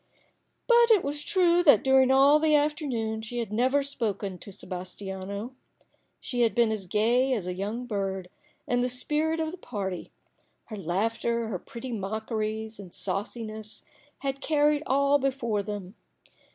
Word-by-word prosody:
But 475 -1 +5
it 430 -6 +5
was 290 +1 -2
true 350 -2 +3
that 285 - +6
during 265 -1 +5
all 275 +3 +6
the 310 -1 +4
afternoon 275 -8 0
she 225 +2 -6
had 230 -3 -3
never 255 +5 +3
once 280 0 0
spoken 200 -8 -3
to - - -10
Sebas 185 -1 -7
tiano. 200 +3 -5 0.7
She 245 -1 -3
had 230 -2 +3
been 235 -2 +3
as 205 -4 -4
gay 240 +7 +2
as 210 -7 -2
a 180 - -3
young 210 +6 -4
bird, 195 -4 -3 0.4
and 245 0 +1
the 250 - 0
spirit 305 +6 0
of 315 -1 -1
the 365 - -9
party, 190 - -5 0.5
her 220 - -8
laughter, 225 +5 -1
her 185 -5 -3
pretty 245 +6 -8
mockeries 220 +1 -3
and 190 -3 -10
sauciness, 215 +1 -4 0.4
had 275 0 -3
carried 295 -1 +2
all 280 +2 +3
before 255 -6 0
them. 200 -2 -6
235 Hz, 160 wpm, -27 LUFS, 205-280 Hz, 0.7 s, that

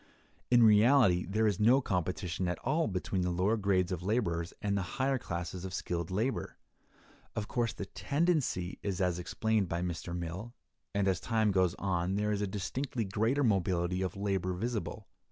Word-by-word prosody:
In 120 -1 +6
reality 110 -4 +5
there 110 +4 +1
is 105 -4 +1
no 120 +5 +5
competition 90 - -2
at 90 -1 -1
all 155 +5 +1
between 95 -1 -2
the 90 - 0
lower 90 +5 +2
grades 95 -4 +1
of 90 -2 -2
laborers 90 -5 0
and 100 -1 -1
the 100 - +1 0.2
higher 135 0 +1
classes 85 -3 -5
of 95 -1 -4
skilled 85 -1 -3
labor. 110 +8 -2 0.8
Of 105 -1 -2
course, 120 -2 0
the 100 - -6
tendency 140 - 0
is 100 -3 -2
as 90 -2 +1
explained 110 +1 0
by 85 +1 -1
Mr. 85 0 -4
Mill, 90 +8 -6 0.4
and 100 -1 +2
as 95 -2 +2
time 110 -2 +1
goes 95 -2 +2
on 90 -1 -1
there 105 +1 0
is 105 -1 -1
a 105 - 0
distinctly 115 +5 -3
greater 110 +9 +1
mobility 90 -4 +1
of 95 +1 -3
labor 95 -2 -1
visible. 110 +1 -3
100 Hz, 175 wpm, -32 LUFS, 90-110 Hz, 0.8 s, In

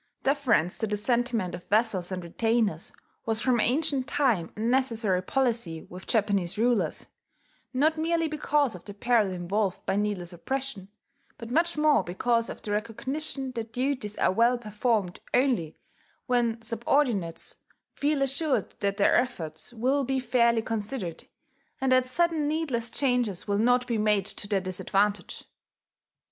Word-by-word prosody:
Deference 265 - +2
to 220 - 0
the 210 0 -1
sentiment 235 -3 0
of 180 0 -7
vassals 205 -4 +1
and 185 -1 -3
retainers 215 -1 0 0.4
was 225 -1 +1
from 245 +1 +2
ancient 270 +2 +1
time 245 - +1
a - - -10
necessary 230 -5 +1
policy 230 -7 -1
with 180 +1 -11
Japanese 200 -5 +1
rulers, 235 0 0 0.6
not 310 +4 +2
merely 330 0 +1
because 295 -3 +1
of 180 - -10
the 205 - -8
peril 220 -2 +2
involved 185 +2 -2
by 195 - 0
needless 200 -4 -2
oppression, 235 +1 -4 0.5
but 230 0 -8
much 340 +4 +2
more 300 -8 +4
because 230 +6 0
of - - -8
the 210 - -4
recognition 265 +6 -3
that 230 -2 -5
duties 250 -5 -2
are - - +3
well 235 +5 +3
performed 210 -4 -1 0.2
only 245 - +1 0.5
when 240 -2 +1
subordinates 230 - 0 0.4
feel 290 -1 +1
assured 275 +2 0
that 200 -1 0
their 200 - +4
efforts 170 -9 -2
will 260 +5 +1
be 265 +1 0
fairly 235 -2 +2
considered, 215 -5 -4 0.5
and 265 -1 +1
that 255 0 +4
sudden 320 +2 +1
needless 290 -7 -1
changes 245 -9 0
will 200 0 +1
not 245 +2 +3
be 235 -3 -1
made 210 -2 +2
to 205 0 -5
their 200 -2 +1
disadvantage. 195 +2 -1
230 Hz, 145 wpm, -27 LUFS, 200-260 Hz, 0.6 s, more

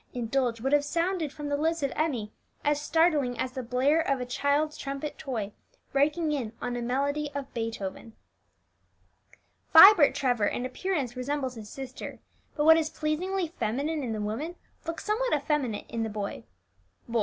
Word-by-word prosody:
indulge 240 0 0
would 270 +5 -1
have 290 0 +5
sounded 335 0 -1
from 295 0 -6
the 285 - 0
lips 320 +1 0
of 275 - 0
Emmie 250 -10 -1 0.3
as 295 0 +2
startling 300 -6 +2
as 255 - -2
the 260 - -4
blare 260 +6 +2
of 275 -5 0
a 250 - -3
child's 285 +4 0
trumpet 275 +1 -5
toy 225 -7 -4 0.4
breaking 300 +3 +2
in 245 -7 -2
on 245 0 -3
a 245 - -3
melody 280 +5 -1
of 280 -1 -5
Beethoven. 225 -1 -4 1.6
Vibert 335 -2 +9
Trevor 245 -6 +1
in 245 - -2
appearance 275 -4 -2
resembles 260 0 -2
his 220 -3 -9
sister; 265 +1 -7 0.4
but 295 - +1
what 320 +1 +8
is 315 -1 0
pleasingly 345 +5 -1
feminine 280 +8 -1
in 245 -4 -3
the 215 - -3
woman 235 +12 -3 0.3
looks 330 0 -4
somewhat 450 +2 +1
effeminate 280 -7 -1
in 230 - -3
the 225 - -1
boy. 205 -1 -5 0.6
Boy! 235 -1 0
280 Hz, 165 wpm, -28 LUFS, 245-310 Hz, 1.6 s, Vibert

